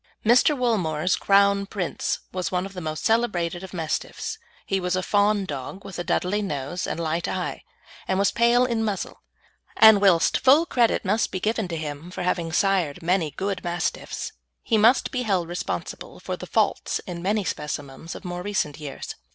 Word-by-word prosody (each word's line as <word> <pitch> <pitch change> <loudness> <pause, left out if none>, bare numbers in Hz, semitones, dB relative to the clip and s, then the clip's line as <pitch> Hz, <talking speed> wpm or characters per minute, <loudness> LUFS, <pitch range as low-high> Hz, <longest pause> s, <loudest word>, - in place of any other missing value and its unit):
Mr. 250 +6 +5
Woolmore's 180 -9 +1
Crown 200 0 +3
Prince 185 -4 -2
was 185 -1 -3
one 180 0 0
of 195 - -9
the 180 - -6
most 155 -1 -4
celebrated 185 -7 +1
of 190 - -8
Mastiffs. 165 -4 -3 0.3
He 195 - 0
was 180 0 -1
a 185 - -1
fawn 205 0 +2
dog 145 +4 -6
with 185 - -7
a - - -1
Dudley 195 +4 0
nose 160 -2 -3
and - - -3
light 165 +1 -1
eye, - - -3 0.5
and 190 - +1
was 200 0 +3
pale 235 +1 +4
in 230 -3 0
muzzle, 205 -3 -3 0.6
and 220 -2 +8
whilst 185 -5 +4
full 285 +6 +5
credit 235 -8 +2
must 215 +4 +1
be 185 - -3
given 220 0 -1
to 170 -2 -4
him 150 +1 -6
for 180 - -5
having 175 -2 -1
sired 180 -5 +1
many 175 -2 +1
good 195 +4 -3
Mastiffs, 175 -2 -3 0.3
he - - +1
must 225 +4 +4
be 255 - -1
held 190 -7 0
responsible 175 +1 -5
for - - -4
the - - -9
faults - - +1
in 175 -2 -6
many 205 +3 +1
specimens 150 -1 -5
of - - -10
more 175 0 -4
recent 180 -7 -2
years. 145 -3 -6
185 Hz, 185 wpm, -24 LUFS, 170-210 Hz, 0.6 s, and